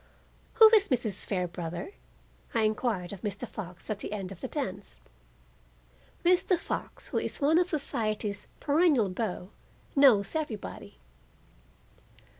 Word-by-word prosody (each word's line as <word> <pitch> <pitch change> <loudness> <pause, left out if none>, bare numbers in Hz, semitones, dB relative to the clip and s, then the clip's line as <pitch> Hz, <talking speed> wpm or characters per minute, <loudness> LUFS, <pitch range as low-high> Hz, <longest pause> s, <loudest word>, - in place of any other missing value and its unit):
"Who 445 - +9
is 410 -2 +6
Mrs. 225 - 0
Fairbrother?" 175 - -3 0.6
I 225 - +3
inquired 215 -4 -1
of 190 - -9
Mr. 205 +3 -4
Fox 180 -5 -8
at 215 -2 -3
the 205 - -5
end 195 -3 -5
of 190 - -10
the - - -3
dance. 200 -9 -5 1.3
Mr. 365 +1 +4
Fox, - - -4
who - - 0
is - - -3
one 305 +4 +4
of 360 0 +2
society's 215 - -1
perennial 290 - +3
beaux, 185 -1 -4 0.4
knows 245 -9 +5
everybody. 235 - -5
215 Hz, 125 wpm, -29 LUFS, 195-290 Hz, 1.3 s, Who